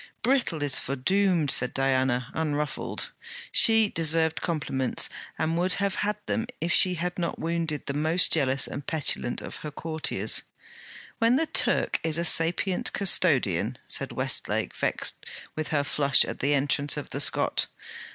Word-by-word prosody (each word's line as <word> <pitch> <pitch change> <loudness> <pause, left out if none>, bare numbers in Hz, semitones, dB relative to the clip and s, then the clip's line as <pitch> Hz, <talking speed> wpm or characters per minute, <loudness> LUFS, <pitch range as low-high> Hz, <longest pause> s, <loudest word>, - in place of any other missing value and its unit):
'Brittle 235 - 0
is 145 -2 +4
foredoomed,' 165 +3 +1
said 125 - +2
Diana, 130 -1 0
unruffled. 150 -1 -3 0.4
She 225 -1 +5
deserved 160 0 +2
compliments, 145 -6 -1 0.3
and 160 +1 -1
would 180 +1 +1
have 200 0 -1
had 210 +1 -1
them 230 0 -2
if 170 +2 -1
she 185 -1 +4
had 175 +2 -4
not 170 - -3
wounded 165 -3 -3
the 140 - -3
most 160 +4 +2
jealous 135 -3 +2
and 140 - -6
petulant 145 -5 -1
of - - -8
her 150 - -7
courtiers. 160 +1 -1 0.8
'Then 230 +1 +3
the 320 +4 +1
Turk - - +1
is 160 -1 -1
a 170 - -1
sapient 175 +3 +2
custodian!' 145 - +2
said - - -2
Westlake, - - -3
vexed - - -2 0.3
with 155 -1 -3
her 145 -3 0
flush 140 -1 +2
at - - -7
the 145 +2 +1
entrance 140 +1 +1
of - - -7
the - - -2
Scot. - - +2
160 Hz, 150 wpm, -26 LUFS, 140-180 Hz, 0.8 s, She